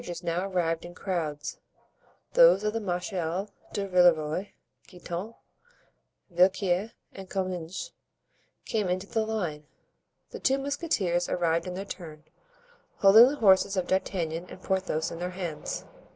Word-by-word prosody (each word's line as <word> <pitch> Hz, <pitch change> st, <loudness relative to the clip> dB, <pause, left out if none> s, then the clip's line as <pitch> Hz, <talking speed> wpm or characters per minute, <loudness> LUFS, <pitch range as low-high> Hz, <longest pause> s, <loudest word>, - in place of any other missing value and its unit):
Carriages 175 Hz, 0 st, -7 dB
now 175 Hz, +3 st, -1 dB
arrived 170 Hz, -4 st, -1 dB
in 175 Hz, 0 st, -10 dB
crowds; 160 Hz, -7 st, -3 dB, 0.7 s
those -, -, +7 dB
of 210 Hz, 0 st, 0 dB
the 225 Hz, -, -1 dB
Marechal 180 Hz, 0 st, -3 dB, 0.2 s
de 200 Hz, -1 st, -2 dB
Villeroy, 175 Hz, -1 st, +3 dB, 0.4 s
Guitant, 180 Hz, +4 st, -6 dB, 1.0 s
Villequier 185 Hz, +3 st, +2 dB, 0.2 s
and 190 Hz, -1 st, -10 dB
Comminges 185 Hz, -, -4 dB, 0.7 s
came 215 Hz, -4 st, -1 dB
into 185 Hz, +2 st, -1 dB
the 220 Hz, +2 st, -1 dB
line. 175 Hz, -9 st, -3 dB, 0.6 s
The -, -, -7 dB
two 270 Hz, 0 st, +2 dB
musketeers 270 Hz, -, -1 dB
arrived 170 Hz, 0 st, 0 dB
in 180 Hz, -, -4 dB
their 195 Hz, +2 st, -5 dB
turn, 155 Hz, -6 st, -9 dB, 0.7 s
holding 215 Hz, +5 st, +8 dB
the 280 Hz, -, -1 dB
horses 195 Hz, -4 st, +4 dB
of 185 Hz, -, +1 dB
D'Artagnan 175 Hz, -2 st, -1 dB
and 185 Hz, -, -11 dB
Porthos 185 Hz, -5 st, -1 dB
in 165 Hz, -, -7 dB
their 180 Hz, +1 st, -2 dB
hands. 180 Hz, -4 st, -5 dB
185 Hz, 135 wpm, -28 LUFS, 170-200 Hz, 1.0 s, holding